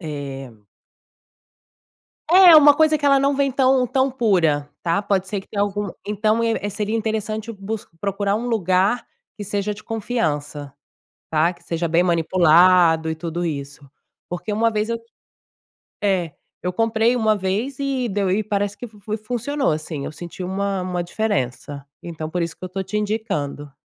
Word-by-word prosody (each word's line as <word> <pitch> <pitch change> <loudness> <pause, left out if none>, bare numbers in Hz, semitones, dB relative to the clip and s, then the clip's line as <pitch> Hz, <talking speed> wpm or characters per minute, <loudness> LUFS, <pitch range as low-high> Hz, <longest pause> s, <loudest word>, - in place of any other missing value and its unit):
eh 140 -4 -6 1.8
É, 365 -2 +9
uma 290 -1 +8
coisa 310 0 +4
que 290 - -6
ela 275 -1 +5
não 275 +1 +2
vem 275 0 +1
tão 260 -1 +3
tão 265 +2 +1
pura, 175 - +1
tá? 170 +3 0
Pode 195 -2 0
ser 200 0 -2
que - - -19
tenha 205 -1 -1
algum 205 0 -2 0.2
então, 215 +2 +1
é 225 -3 0
seria 210 +2 -2
interessante 220 0 -3
bus 210 +1 -6
procurar 200 +1 0
um 240 +2 -4
lugar 195 +1 +1 0.3
que 205 - -6
seja 205 +1 -2
de 210 - -13
confiança, 150 - -3 0.6
tá? 160 +2 +2
Que 175 - -21
seja 170 0 -2
bem 165 +2 +3
manipulado 170 -1 +4
e - - -1
tudo 170 +2 -4
isso. 140 -2 -5 0.4
Porque 180 +4 -4
uma 225 +2 +2
vez 215 0 -1
eu 230 0 -1 1.1
é, 180 -6 0 0.3
eu 180 - -1
comprei 225 +3 +2
uma 220 -3 +2
vez 205 +8 -2
e 270 -3 -1
deu 200 -2 -1
e 205 +4 +1
parece 205 0 -2
que 245 - -7
fu 210 -1 -18
fui 215 +2 -4
funcionou 245 - -1
sim, 155 -2 -6
eu - - -5
senti 175 +3 -8
uma 195 +1 -2
uma 180 -1 -2
diferença. 145 - -3 0.2
Então, 160 -2 -6
por 180 +2 -2
isso 170 -1 -3
que - - -14
eu 185 - -7
tô 190 +1 -3
te 210 +3 -3
indicando. 150 -10 -3
200 Hz, 170 wpm, -21 LUFS, 170-225 Hz, 1.8 s, É